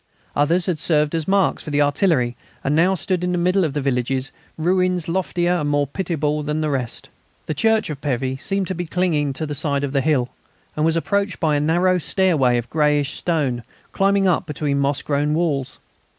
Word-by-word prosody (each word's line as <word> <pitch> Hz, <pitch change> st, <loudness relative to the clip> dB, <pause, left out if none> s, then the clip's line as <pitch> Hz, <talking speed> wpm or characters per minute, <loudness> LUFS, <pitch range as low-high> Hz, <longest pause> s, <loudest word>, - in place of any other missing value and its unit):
Others 165 Hz, +5 st, +2 dB
had 175 Hz, -5 st, -1 dB
served 150 Hz, -2 st, +1 dB
as 165 Hz, -2 st, -2 dB
marks 195 Hz, -2 st, +2 dB
for -, -, -7 dB
the 145 Hz, 0 st, +3 dB
artillery, 145 Hz, -5 st, +1 dB, 0.3 s
and 140 Hz, -, +1 dB
now 180 Hz, +4 st, +3 dB
stood 185 Hz, 0 st, -2 dB
in 180 Hz, 0 st, 0 dB
the -, -, 0 dB
middle 180 Hz, +2 st, +2 dB
of 155 Hz, -5 st, -1 dB
the 145 Hz, -, -1 dB
villages, 130 Hz, 0 st, -1 dB, 0.3 s
ruins 180 Hz, +1 st, +1 dB
loftier 175 Hz, 0 st, 0 dB
and 150 Hz, -3 st, -1 dB
more 145 Hz, 0 st, +2 dB
pitiable 150 Hz, -1 st, -2 dB
than 150 Hz, +1 st, -2 dB
the 155 Hz, -1 st, 0 dB
rest. 125 Hz, -4 st, -3 dB, 0.4 s
The -, -, -2 dB
church 220 Hz, +4 st, +1 dB
of 145 Hz, -2 st, -7 dB
Pévy 130 Hz, -1 st, -2 dB
seemed 195 Hz, -1 st, 0 dB
to -, -, -1 dB
be 175 Hz, -1 st, -4 dB
clinging 160 Hz, -5 st, 0 dB
to 155 Hz, +4 st, -3 dB
the 150 Hz, -, -4 dB
side 145 Hz, -1 st, 0 dB
of 140 Hz, -1 st, -3 dB
the 135 Hz, -, +2 dB
hill, 135 Hz, -4 st, +1 dB, 0.5 s
and 150 Hz, -, -1 dB
was 165 Hz, 0 st, +3 dB
approached 200 Hz, +3 st, -1 dB
by 155 Hz, -3 st, +2 dB
a -, -, +2 dB
narrow 175 Hz, +4 st, +2 dB
stairway 150 Hz, -6 st, +2 dB
of 120 Hz, 0 st, -3 dB
greyish 150 Hz, -2 st, +1 dB
stone, 145 Hz, -8 st, -1 dB, 0.3 s
climbing 195 Hz, 0 st, +2 dB
up 180 Hz, -, +1 dB
between 145 Hz, -1 st, -1 dB
moss 140 Hz, 0 st, 0 dB
grown 150 Hz, +1 st, 0 dB
walls. 145 Hz, -6 st, -1 dB
155 Hz, 205 wpm, -21 LUFS, 140-180 Hz, 0.5 s, the